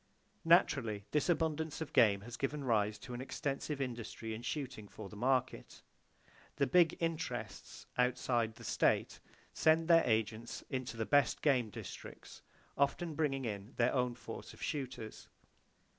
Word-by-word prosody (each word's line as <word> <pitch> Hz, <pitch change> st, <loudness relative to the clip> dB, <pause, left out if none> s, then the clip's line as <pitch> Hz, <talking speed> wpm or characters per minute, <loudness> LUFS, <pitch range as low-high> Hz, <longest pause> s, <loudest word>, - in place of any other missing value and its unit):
Naturally, 120 Hz, -, +3 dB
this 150 Hz, +3 st, +1 dB
abundance 160 Hz, -2 st, 0 dB
of 160 Hz, -3 st, -5 dB
game 100 Hz, -3 st, +5 dB
has 115 Hz, +2 st, -8 dB
given 140 Hz, +3 st, -2 dB
rise 105 Hz, -4 st, +1 dB
to 125 Hz, +4 st, -9 dB
an 120 Hz, -, -4 dB
extensive 140 Hz, +2 st, -3 dB
industry 115 Hz, -3 st, -4 dB
in 110 Hz, -, -6 dB
shooting 130 Hz, -6 st, -4 dB
for 100 Hz, -1 st, -9 dB
the 105 Hz, -, -11 dB
market. 130 Hz, +3 st, -1 dB, 0.7 s
The 140 Hz, -, +2 dB
"big 165 Hz, +5 st, +4 dB
interests" 155 Hz, -, -4 dB
outside 125 Hz, -2 st, +1 dB
the -, -, -13 dB
state -, -, +1 dB, 0.3 s
send 160 Hz, +1 st, +3 dB
their 165 Hz, -1 st, +7 dB
agents 110 Hz, 0 st, -1 dB
into 130 Hz, -3 st, -3 dB
the 110 Hz, -, -1 dB
best 145 Hz, -2 st, +3 dB
game 130 Hz, -7 st, +3 dB
districts, 100 Hz, -, -9 dB, 0.3 s
often 155 Hz, +4 st, +1 dB
bringing 140 Hz, -4 st, 0 dB
in 105 Hz, +1 st, -5 dB
their 120 Hz, +1 st, +3 dB
own 125 Hz, -2 st, +1 dB
force -, -, -8 dB
of -, -, -10 dB
shooters. 130 Hz, -6 st, -5 dB
125 Hz, 145 wpm, -35 LUFS, 115-150 Hz, 0.7 s, their